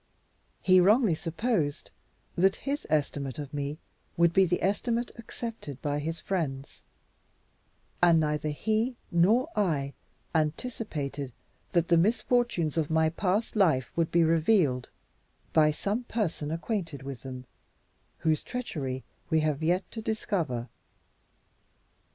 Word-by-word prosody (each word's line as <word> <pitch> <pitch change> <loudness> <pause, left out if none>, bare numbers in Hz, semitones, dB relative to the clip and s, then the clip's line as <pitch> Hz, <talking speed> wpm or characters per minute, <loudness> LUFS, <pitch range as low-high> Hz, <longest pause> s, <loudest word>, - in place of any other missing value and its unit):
He 185 0 +6
wrongly 210 +2 +5
supposed 165 - -1 0.4
that 190 +2 +4
his 285 +1 -2
estimate 145 -3 -1
of 145 -2 -6
me 145 +1 -3 0.4
would 170 0 +4
be 190 +1 +6
the 180 - 0
estimate 235 +5 0
accepted 230 - -7
by 145 -1 -1
his 165 +3 -3
friends; 145 -8 -3 1.2
and 170 -2 +6
neither 150 0 0
he 220 - 0 0.2
nor 215 - +4
I 150 -9 0 0.4
anticipated 150 - -2 0.4
that 170 -1 +2
the 170 - +6
misfortunes 210 -4 +2
of 155 -2 +1
my 160 0 +3
past 195 +7 -1
life 160 - +3
would 165 -1 +1
be 170 0 +4
revealed 160 - +3 0.6
by 155 -1 +6
some 205 +10 -1
person 175 -11 -2
acquainted 165 - -3
with 135 -3 -6
them, 130 -1 -7 0.8
whose 155 -1 +2
treachery 140 - -4 0.3
we 160 -2 +3
have 155 -1 0
yet 175 +4 +2
to 225 - -5
discover. 175 - -2
165 Hz, 120 wpm, -29 LUFS, 145-205 Hz, 1.2 s, He